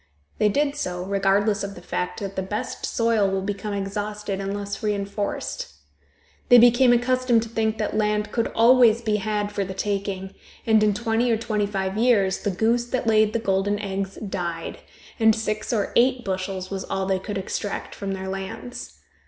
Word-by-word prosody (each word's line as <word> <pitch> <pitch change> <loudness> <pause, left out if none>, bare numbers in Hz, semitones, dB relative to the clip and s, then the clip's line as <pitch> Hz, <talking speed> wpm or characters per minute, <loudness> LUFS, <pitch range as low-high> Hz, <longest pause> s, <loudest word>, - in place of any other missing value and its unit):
They 210 - +4
did 285 +6 +1
so, 180 -6 -3
regardless 200 +1 +1
of 200 0 -5
the 175 - -11
fact 180 +5 -3
that 195 -1 -5
the 190 - -1
best 205 +3 -4
soil 230 -4 +2
will 190 0 -1
become 205 +1 -3
exhausted 205 0 -3
unless 200 +1 -4
reenforced. 200 - -3 0.8
They 245 - +9
became 240 +1 +6
accustomed 245 -1 +2
to 230 - -8
think 220 -1 0
that 210 -1 -2
land 210 0 0
could 230 -1 0
always 235 -1 +5
be 215 -1 +1
had 210 0 -2
for 200 -1 -1
the 190 0 -6
taking, 195 -1 -3 0.3
and 220 -1 +4
in 210 -1 +3
twenty 230 +2 +1
or 225 - +3
twenty 215 -2 -1
five 195 0 -2
years, 210 -6 +3
the - - -2
goose 225 +5 +1
that 245 0 -2
laid 215 -1 +4
the - - +2
golden 205 -2 0
eggs 195 -1 -4
died, 175 -5 -4 0.4
and 220 -1 +5
six 215 -1 -2
or 215 -4 -1
eight 250 0 +3
bushels 185 0 -3
was 190 -1 -3
all 195 0 -2
they 190 0 0
could 205 +2 -5
extract 195 +1 -4
from 195 -1 -4
their 190 0 -5
lands. 195 +6 -7
205 Hz, 180 wpm, -24 LUFS, 195-225 Hz, 0.8 s, They